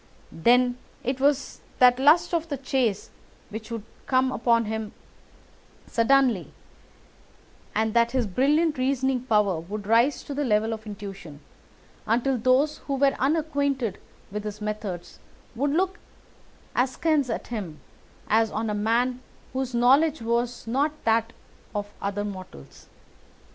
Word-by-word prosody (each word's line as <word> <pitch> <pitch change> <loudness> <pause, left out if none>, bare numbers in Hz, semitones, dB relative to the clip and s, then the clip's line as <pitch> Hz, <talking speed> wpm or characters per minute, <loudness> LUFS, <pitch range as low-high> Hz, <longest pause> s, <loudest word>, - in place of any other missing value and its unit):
Then 245 +7 +3 0.2
it 260 +2 -2
was 280 0 +1 0.2
that 250 -1 +6
the - - -4
lust 315 +5 +5
of 330 -1 0
the 285 - -2
chase 255 -6 -1 0.4
would 220 +1 -5
suddenly 225 -1 -6 0.2
come 260 0 +2
upon 230 -1 +2
him, 220 0 -4 1.0
and 230 -2 -2
that 235 0 +4
his 255 -2 +1
brilliant 295 - +2
reasoning 265 0 +1
power 210 -8 +1
would 205 +5 -6
rise 235 +6 +3
to 285 - -6
the 290 +1 -1
level 220 -2 +1
of 220 0 -8
intuition, 195 -7 -8 0.7
until 245 +3 +1
those 255 +6 +2
who 280 - -3
were 275 0 +3
unacquainted 280 - 0 0.3
with 210 +1 -4
his 210 0 -6
methods 210 -4 -5 0.3
would 275 +5 0
look 370 +6 0 0.8
askance 270 +2 +1
at 225 - -4
him 180 -9 -5 0.5
as 225 +1 +3
on 220 +1 -2
a - - -1
man 235 +4 +1 0.3
whose 260 -2 -2
knowledge 275 +6 +4
was 235 +1 -1
not 275 +6 +1
that 225 0 +2 0.4
of 205 0 -4
other 200 +1 -2
mortals. 70 - -10
240 Hz, 135 wpm, -25 LUFS, 215-270 Hz, 1.0 s, that